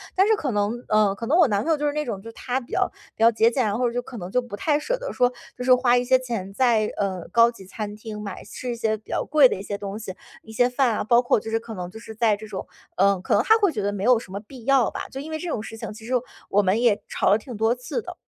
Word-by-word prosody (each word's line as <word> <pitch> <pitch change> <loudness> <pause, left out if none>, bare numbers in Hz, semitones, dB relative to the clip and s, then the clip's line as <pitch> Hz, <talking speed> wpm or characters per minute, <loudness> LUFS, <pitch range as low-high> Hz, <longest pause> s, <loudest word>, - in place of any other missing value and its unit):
但 385 +2 +4
是 440 - +4
可 285 - -2
能 210 +4 -1
呃， 210 -2 +3
可 230 - -6
能 325 - +3
我 345 - +6
男 205 -3 +1
朋 325 - 0
友 310 - +3
就 295 - -2
是 290 - 0
那 300 0 -1
种 205 -5 -4
就 230 - -10
他 255 +1 -2
比 240 - -15
较 - - +1 0.2
比 225 - -1
较 230 - +7
节 225 +1 +4
俭， 255 +1 0
然 205 +1 0
后 245 -1 +2
就 245 +1 -2
可 245 -1 -10
能 180 -1 -6
就 250 - +2
不 240 -4 -8
太 295 +4 +1
舍 - - -1
得 - - -5
说 245 0 +3 0.3
就 250 - -4
是 255 0 +6
花 250 -1 +4
一 245 - +1
些 260 +1 +4
钱 225 -7 -5
在， 230 -3 +3
呃， 190 -3 -2
高 235 0 +6
级 195 -5 -13
餐 210 +2 -6
厅 215 -1 -8
买 200 -3 -7
吃 255 - -7
一 - - -3
些 220 -2 0
比 215 - -23
较 - - -1
贵 290 -2 +6
的 - - -1
一 190 - -7
些 200 0 -4
东 200 0 -6
西， 195 -4 -6 0.3
一 220 - -12
些 245 +3 +3
饭 250 -2 +2
啊， - - -1
包 240 +1 +5
括 245 - +2
就 225 - -7
是 225 - +2
可 225 0 -9
能 180 -2 -5
就 220 - -11
是 220 - -9
在 220 -2 +3
这 215 +1 -10
种 200 -3 -6 0.3
嗯， 195 -1 +3
可 - - -1
能 205 - +5
他 445 +8 +5
会 400 -5 +3
觉 215 - -3
得 205 - 0
没 200 - -4
有 245 0 +5
什 215 - -13
么 200 - -4
必 240 +3 -13
要 270 -4 +4
吧， - - -5
就 265 - -6
因 315 +2 -8
为 315 - -3
这 355 - -5
种 220 - -2
事 225 0 -8
情， 215 - -6
其 220 +1 -12
实 250 - -7 0.4
我 205 - +4
们 200 +4 +1
也 210 -4 +3
吵 - - 0
了 205 - +5
挺 235 +1 -9
多 225 +2 +2
次 250 - -4
的。 - - -8
230 Hz, 345 characters per minute, -24 LUFS, 205-255 Hz, 0.4 s, 较